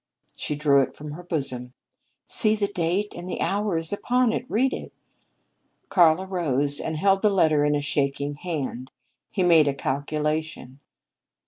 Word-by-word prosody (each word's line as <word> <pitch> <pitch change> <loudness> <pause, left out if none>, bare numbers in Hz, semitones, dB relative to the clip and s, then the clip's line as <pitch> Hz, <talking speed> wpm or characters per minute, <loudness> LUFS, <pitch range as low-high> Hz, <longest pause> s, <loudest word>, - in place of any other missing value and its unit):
She 150 - -3
drew 140 -2 +4
it 135 - -3
from 150 0 -8
her 160 +4 -8
bosom. 135 -8 -3 0.5
"See, 215 -1 +2
the 210 -1 0
date 185 +2 -1
and 175 +1 -7
hour 200 0 0
is 165 +3 -3
upon 245 +2 +1
it. 245 - -4
Read 260 +5 +1
it." - - -6 1.0
Karl 175 -2 +4
arose 145 -7 0
and 160 -1 -3
held 195 +3 +3
the 210 - +4
letter 160 -7 +3
in 150 0 +2
a 145 - 0
shaking 140 0 -1
hand. 140 -6 -4 0.4
He 185 - -1
made 165 -4 +5
a 140 - 0
calculation. 150 0 -3
160 Hz, 155 wpm, -25 LUFS, 145-190 Hz, 1.0 s, made